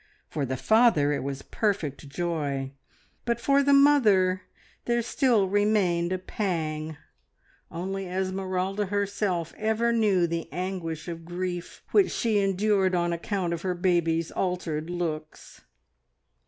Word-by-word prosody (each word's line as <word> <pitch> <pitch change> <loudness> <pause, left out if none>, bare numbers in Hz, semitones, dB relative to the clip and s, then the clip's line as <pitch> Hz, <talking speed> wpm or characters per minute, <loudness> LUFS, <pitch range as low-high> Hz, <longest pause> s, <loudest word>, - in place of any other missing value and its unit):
For 140 -3 -3
the 130 +1 -2
father 220 - +4
it 145 - -2
was 135 0 -5
perfect 160 -9 -2
joy, 145 -4 -2 0.5
but 235 -1 -1
for 275 +4 +3
the 280 0 +2
mother 215 -11 +5 0.4
there 235 0 +1
still 240 -5 +2
remained 190 -4 +2
a 185 - +1
pang. 160 -5 -3 0.7
Only 190 +2 -4
Esmeralda 190 +1 -2
herself 200 -4 -1
ever 220 +2 +1
knew 205 -6 +3
the 170 -2 -4
anguish 175 -2 -4
of 165 -1 -6
grief 175 +1 -5
which 400 -3 +5
she 220 -3 +1
endured 195 -1 +2
on 175 -1 +1
account 175 0 -2
of 170 - -4
her 185 -1 -1
baby's 170 -2 +1
altered 170 -4 -2
looks. 160 -3 -5
185 Hz, 125 wpm, -27 LUFS, 165-205 Hz, 0.7 s, mother